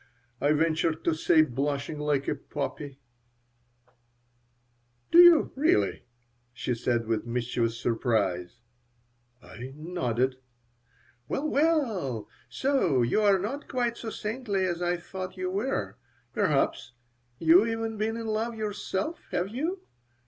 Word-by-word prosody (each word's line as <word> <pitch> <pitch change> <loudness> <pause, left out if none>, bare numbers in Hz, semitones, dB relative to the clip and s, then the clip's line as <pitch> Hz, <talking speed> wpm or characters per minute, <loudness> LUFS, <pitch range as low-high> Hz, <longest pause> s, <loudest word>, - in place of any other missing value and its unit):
I 145 +2 +3
ventured 160 +1 +1
to 165 - +2
say, 155 0 +4
blushing 140 +2 -2
like 145 -2 0
a - - +2
poppy 145 0 -5 2.1
"Do 340 - +7
you, 345 -2 +8
really?" 310 +7 +1 0.5
she 125 +1 -3
said, 120 0 0
with 115 +1 -2
mischievous 115 -1 -1
surprise 110 -4 -1 0.8
I 130 +2 -9
nodded 130 -6 -1 0.9
"Well, 295 - -1
well. 240 - 0 0.2
So 165 - +1
you 120 - +2
are 200 -2 +5
not 240 +10 -4
quite 240 -3 -1
so 230 - -6
saintly 210 -3 -2
as 175 -1 -2
I 175 0 +1
thought 185 +1 -7
you 185 0 -2
were! 185 - -2 0.4
Perhaps 135 -3 0 0.4
you 165 +4 +6
have 220 - +1
even 225 -1 -3
been 220 +2 -1
in 230 - -5
love 220 +2 -1
yourself? 215 - -3
Have 180 +2 -1
you? 320 - -3
175 Hz, 125 wpm, -28 LUFS, -, 2.1 s, you